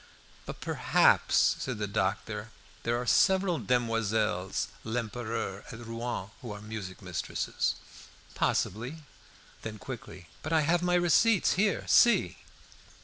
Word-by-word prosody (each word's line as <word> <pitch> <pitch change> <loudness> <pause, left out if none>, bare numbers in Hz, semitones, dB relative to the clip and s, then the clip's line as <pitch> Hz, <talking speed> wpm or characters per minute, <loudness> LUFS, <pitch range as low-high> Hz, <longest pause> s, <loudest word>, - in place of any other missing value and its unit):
"But - - -7
perhaps," - - +3
said 130 -4 -3
the 105 - -2
doctor, 105 +2 -2 0.3
"there 120 +1 0
are 125 - -3
several 190 +4 +3
Demoiselles 110 -6 0
Lempereur 115 -3 -3
at 115 - -8
Rouen 115 -3 -4
who 120 -4 -7
are 105 - -7
music 105 -3 -7
mistresses." 90 -4 -2 0.6
"Possibly!" 125 - -1 0.6
Then 110 -1 -6
quickly 90 -2 -9
"But 155 - -3
I 160 - +5
have 165 +3 +2
my 180 0 +2
receipts 180 +4 +4
here. 200 +1 +1
See!" 240 - +4
115 Hz, 120 wpm, -29 LUFS, 105-155 Hz, 0.6 s, I